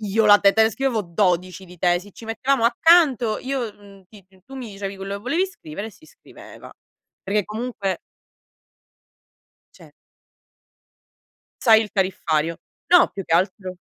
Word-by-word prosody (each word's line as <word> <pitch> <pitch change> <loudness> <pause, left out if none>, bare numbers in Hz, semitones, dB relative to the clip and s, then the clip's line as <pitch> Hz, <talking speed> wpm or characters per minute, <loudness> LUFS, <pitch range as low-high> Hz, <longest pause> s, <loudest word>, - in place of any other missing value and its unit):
io 215 +1 +1
la 205 0 +8
te 200 -1 +4
te 220 - +4
la 220 - +2
scrivevo 260 -1 -1
12 180 0 -1
di 180 -1 -15
tesi". 180 +3 0
Ci 225 - -13
mettiamo 245 +2 0
accanto 255 -4 +3
io, 255 -5 -4
mhmm, 200 -1 -18
ti 200 -4 -17 0.2
tu 270 - -13
mi 245 -5 -7
dicevi 195 0 -6
quello 195 +1 -6
che - - -10
volevi 330 +10 0
scrivere 200 - -9
e - - -9
si 315 - -21
scriveva, - - -15 0.5
perché 205 0 -1
comunque 215 -3 -4 1.8
Cioè - - -17 1.7
Sai 220 -2 +6
il 215 - -5
tariffario. 165 -4 -1 0.3
No 355 0 +5
più 195 - -6
che - - -1
altro 185 +1 0
205 Hz, 150 wpm, -22 LUFS, 190-235 Hz, 1.8 s, la